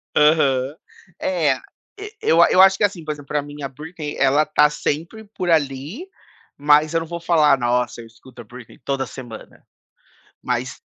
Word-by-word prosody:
Aham. 145 -3 +3 0.4
É. 160 -7 +1 0.4
E 420 +1 -8
eu 165 +1 +4
a - - +6
eu 185 - +6
acho 190 0 +6
que - - -1
assim, 195 -5 0
por 155 - -4
exemplo, 145 -2 -9
pra 150 - -1
mim, 145 0 -10
a - - -2
Britney, 150 +2 -8
ela 140 +3 +3
tá 150 0 +3
sempre 165 +8 -4
por 180 -2 -3
ali, 155 - -1 0.5
mas 150 +2 +3
eu 165 - +2
não 165 - -7
vou 170 +1 -6
falar: 155 -4 +3
"Nossa, 120 0 -1
eu 115 - -12
escuto 120 +2 -15
a - - -14
Britney 120 +1 -14
toda 135 -1 -1
semana", 120 -4 -11 0.8
mas - - -3
150 Hz, 180 wpm, -21 LUFS, 135-165 Hz, 0.8 s, a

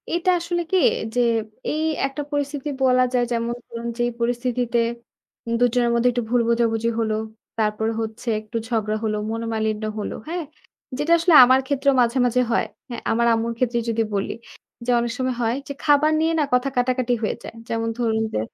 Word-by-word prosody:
এটা 345 +2 0
আসলে 345 +1 -2
কি? 380 - +4 0.4
যে - - +2 0.5
এই 310 - -1 0.3
একটা 275 +2 -5
পরিস্থিতি 290 0 -2
বলা 255 -1 +4
যায় 245 -1 +3
যেমন 235 0 -1
ধরুন, 235 0 -6
যেই 240 0 +1
পরিস্থিতিতে 240 0 0 0.8
দুজনের 245 0 +2
মধ্যে 235 +1 +3
একটু 240 0 -2
ভুল 245 0 +3
বোঝাবুঝি 230 -1 +1
হলো। 220 -1 0 0.4
তারপরে 220 0 0
হচ্ছে 220 +2 -6
একটু 215 +2 -6
ঝগড়া 215 -2 -1
হলো, 215 -1 0
মনোমালিন্য 220 -1 -2 0.2
হল। 205 - -3 0.2
হ্যাঁ? 340 0 -3 0.5
যেটা 295 +4 -1
আসলে 335 +1 +3
আমার 260 +1 +5
ক্ষেত্রেও 280 0 +2
মাঝে, 240 +2 +1
মাঝে 245 +1 +2
হয়। 230 - +2 0.2
হ্যাঁ, 240 - -6
আমার 235 +1 +2
আম্মুর 230 +1 -1
ক্ষেত্রে 240 -1 +1
যদি 225 0 +1
বলি 195 - -1 0.5
যে, - - -4
অনেক 235 0 -1
সময় 255 -1 -1
হয় 230 +1 +1
যে 280 - -4
খাবার 300 0 +4
নিয়ে 325 +1 +2
না? - - +3
কথা 250 +2 +2
কাটাকাটি 250 0 +1
হয়ে 215 - 0
যায়। - - -9
যেমন 225 0 -1
ধরুন 225 -2 +1
যে - - 0
240 Hz, 180 wpm, -22 LUFS, 225-260 Hz, 0.8 s, আমার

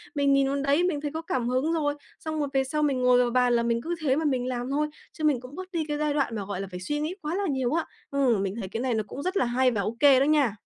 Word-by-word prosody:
mình 280 -1 +3
nhìn 275 0 +3
vào 275 - 0
đấy, 280 +5 +2
mình 340 -5 0
thấy 295 -1 -3
có 320 - -3
cảm 250 -6 -2
hứng 265 +6 +1
rồi, 295 -3 +1 0.3
xong 315 -1 -4
rồi 290 - 0
về 270 0 +3
sau 300 +3 -1
mình 275 -4 +1
ngồi 250 0 +5
vào 245 -1 +3
bàn 250 0 +3
là 235 - +2
mình 235 0 0
cứ 340 +6 -3
thế 270 -4 +2
mà 315 +2 -1
mình 255 -4 0
làm 245 0 -3
thôi, 300 +2 +1 0.3
chứ 315 - -8
mình 295 -5 +3
cũng 250 +3 -11
bớt 370 +1 -8
đi 330 -4 -1
cái 295 - -2
giai 300 -1 0
đoạn 275 -5 0
mà, 205 -2 -4
gọi 195 -1 -4
là, 195 - -5
phải 180 - -6
suy 295 +11 -2
nghĩ 315 +5 -2
quá 310 +3 -3
là 405 - -1
nhiều 265 -1 0
á. 330 0 0 0.3
Ừm, 255 -8 +2
mình 195 0 -3
thấy 195 - -4
cái 225 +5 -4
này 255 -1 0
nó 220 -1 0
cũng 275 +7 -7
rất 375 +2 -1
là - - +3
hay 250 +2 +2
và 215 -4 -1
OK 255 +6 +4
đó - - +4
nha. 285 -8 +3
275 Hz, 325 wpm, -26 LUFS, 245-300 Hz, 0.3 s, ngồi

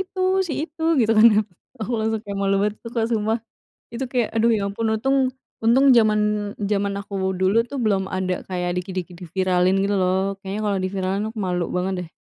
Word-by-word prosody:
itu 380 0 -5 0.3
si - - -2
itu 320 0 -11 0.2
gitu 225 -1 +3
kan 220 - +8 0.5
aku 225 +3 -3
langsung 220 0 -1
kayak 200 -1 -5
malu 195 0 +2
banget 210 0 0
tuh, 230 - -8 0.2
sumpah 220 +1 +1 0.6
itu 240 +3 -3
kayak 245 -4 +1
aduh 225 +1 +3
ya - - -1
ampun 225 +3 -2
untung 270 +5 +1 0.5
untung 250 +4 +5
zaman 215 -2 +4 0.5
zaman 200 -1 0
aku 200 - -13 0.3
dulu 190 +4 +3
tuh 280 - -5
belum 200 -3 +2
ada 185 -1 -1 0.2
kayak 180 -1 -2
dikit-dikit 180 -1 -5
di 180 - -8
viralin 185 -1 +2
gitu 200 +1 +1
loh, 185 +1 +2 0.2
kayaknya 195 +2 -5
kalau 200 -1 +1
di - - +1
viralin 190 +1 -1
aku 220 0 -8
malu 180 -1 -1
banget 185 +2 0
deh. 165 - -18
200 Hz, 195 wpm, -22 LUFS, 185-225 Hz, 0.6 s, kan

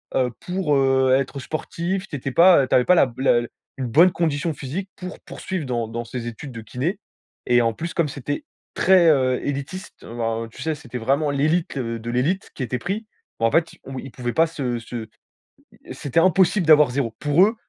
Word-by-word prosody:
heu, 125 -2 +2
pour, 180 -5 -1
heu, 135 -1 +3
être 135 +1 -3
sportif. 170 +7 -3
Tu 145 - -5
étais 135 0 -4
pas 170 -3 +6
tu - - +2
avais 125 - +4
pas 180 - +5
la 130 -8 +3
la 120 -3 +2 0.3
une 130 -2 -3
bonne 165 +10 +5
condition 160 -1 -1
physique 160 +9 -5
pour 180 0 -8
poursuivre 185 -6 -5
dans 120 -3 -2
dans 115 +1 -4
ces 120 0 -5
études 120 +4 -7
de 115 -2 -8
kiné. 145 - -3 0.5
Et 120 0 +4
en 115 -1 +2
plus, 165 +8 -5
comme 165 -4 +1
c'était 145 +1 -4 0.3
très, 185 -2 +5
heu, 130 -4 +3
élitiste, 145 +8 -5
heu, - - -10
ben, 115 -1 -1
heu, 115 - -12
tu - - -12
sais, 160 -1 -1
c'était 125 -4 -8
vraiment 140 +5 +1
l'élite, 155 +2 0
heu, 115 -2 -3
de 115 +1 -6
l'élite 145 +11 -1
qui 135 - -4
était 125 +1 -3
pris. 200 - -3 0.3
Bah 115 - +2
en 115 - +3
fait, 165 +4 +1
on 135 0 -7
ils 135 - -9
pouvaient 120 -1 -4
pas 165 +1 +4
se 130 -7 -3
se 115 0 -7 0.8
c'était 140 +3 -1
impossible 185 +1 +3
d'avoir 150 -2 +7
0. 125 -4 -2
Pour 145 +6 +4
eux, 220 +3 0
140 Hz, 210 wpm, -22 LUFS, 125-170 Hz, 0.8 s, d'avoir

